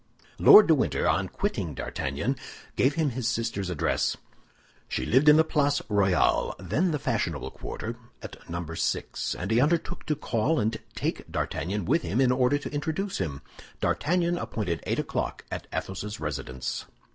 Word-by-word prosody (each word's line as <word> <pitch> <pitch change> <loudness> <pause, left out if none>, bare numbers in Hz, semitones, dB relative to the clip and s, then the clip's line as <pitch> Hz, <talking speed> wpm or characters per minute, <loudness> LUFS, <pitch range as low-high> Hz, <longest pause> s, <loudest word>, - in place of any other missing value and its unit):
Lord 215 - +10
de 165 - +5
Winter, 145 - +1
on - - +2
quitting - - -2
D'Artagnan, 70 - -2 0.4
gave 135 +3 +2
him 155 -4 +1
his 125 -1 -2
sister's 115 -6 -1
address. 85 -5 0 0.7
She 65 - -2
lived 135 +6 +5
in 150 - +8
the 160 - +6
Place 145 -2 +1
Royale—then 100 - +2
the 155 - 0
fashionable - - -2
quarter—at - - -8
Number 85 -1 -4
6, - - -2
and 90 +4 -4
he 115 +2 +4
undertook 165 +4 0
to 150 - +1
call 130 +2 0
and 110 +1 0 0.2
take - - -3
D'Artagnan 100 +2 -2
with 165 - +2
him 115 - -1
in 130 -2 +4
order 125 +2 +3
to 145 - -6
introduce 160 +7 -2
him. 75 -7 -3 0.4
D'Artagnan 175 +2 +1
appointed 90 -7 -3
eight - - 0
o'clock - - -3
at - - -5
Athos's 105 +3 -4
residence. 65 -4 -4
120 Hz, 155 wpm, -27 LUFS, 90-150 Hz, 0.7 s, Lord